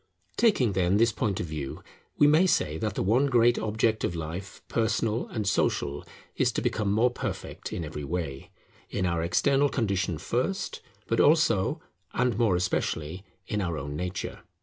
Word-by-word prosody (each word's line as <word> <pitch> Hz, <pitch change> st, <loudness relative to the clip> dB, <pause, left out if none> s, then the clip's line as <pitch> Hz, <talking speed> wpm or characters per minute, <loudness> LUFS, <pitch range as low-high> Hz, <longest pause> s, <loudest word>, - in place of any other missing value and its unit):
Taking, 140 Hz, -, +3 dB
then, 95 Hz, +1 st, +2 dB
this 115 Hz, +2 st, +4 dB
point 105 Hz, -3 st, -1 dB
of -, -, -2 dB
view, 75 Hz, -4 st, -6 dB, 0.3 s
we -, -, +6 dB
may 155 Hz, +5 st, +5 dB
say 80 Hz, -, +1 dB
that 105 Hz, -3 st, -2 dB
the -, -, 0 dB
one 120 Hz, +9 st, +3 dB
great 120 Hz, -2 st, +4 dB
object 110 Hz, +1 st, 0 dB
of 85 Hz, -, -1 dB
life, 85 Hz, +4 st, -6 dB
personal 115 Hz, 0 st, 0 dB
and 105 Hz, -4 st, -3 dB
social, 70 Hz, -6 st, 0 dB, 0.3 s
is -, -, +2 dB
to -, -, -1 dB
become 105 Hz, -2 st, 0 dB
more 115 Hz, +4 st, +3 dB
perfect -, -, -5 dB
in 85 Hz, -, -3 dB
every 75 Hz, -1 st, -6 dB
way; 70 Hz, -3 st, -4 dB, 0.4 s
in 95 Hz, -, -1 dB
our 85 Hz, -2 st, 0 dB
external 135 Hz, +12 st, +2 dB
condition 100 Hz, -, 0 dB
first, 130 Hz, -, -2 dB, 0.2 s
but 115 Hz, -, 0 dB
also, 145 Hz, -, +3 dB, 0.3 s
and 125 Hz, -3 st, +2 dB
more 110 Hz, -5 st, +3 dB
especially, 90 Hz, -1 st, -1 dB, 0.2 s
in 105 Hz, +2 st, -2 dB
our 85 Hz, -4 st, -2 dB
own 75 Hz, 0 st, -5 dB
nature. 90 Hz, +4 st, -4 dB
100 Hz, 170 wpm, -27 LUFS, 85-115 Hz, 0.4 s, we